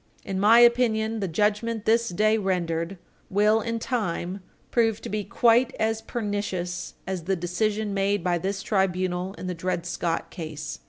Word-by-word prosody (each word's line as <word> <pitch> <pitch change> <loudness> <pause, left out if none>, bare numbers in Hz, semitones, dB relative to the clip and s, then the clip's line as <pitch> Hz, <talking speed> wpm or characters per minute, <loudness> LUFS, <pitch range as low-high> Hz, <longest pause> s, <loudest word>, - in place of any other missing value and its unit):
In 195 -2 -2
my 215 +4 +6
opinion, 225 -2 +3
the 195 - -1
judgment 210 +5 0
this 230 +1 +3
day 215 +5 +2
rendered 175 -2 -1 0.3
will, 210 +3 +3
in 230 +1 -2
time, 195 -6 -2 0.3
prove 225 -3 +2
to - - -6
be 210 +1 -2
quite 235 +4 +3
as 220 0 0
pernicious 205 -6 -3
as 185 -3 -4
the 190 +1 +1
decision 205 +4 -1
made 195 -1 +1
by 175 -1 +1
this 195 +2 -3
tribunal 185 -1 0
in - - -8
the 180 - -2
Dred 175 0 -2
Scott 170 -2 -2
Case. 155 -3 -6
200 Hz, 160 wpm, -25 LUFS, 180-220 Hz, 0.3 s, my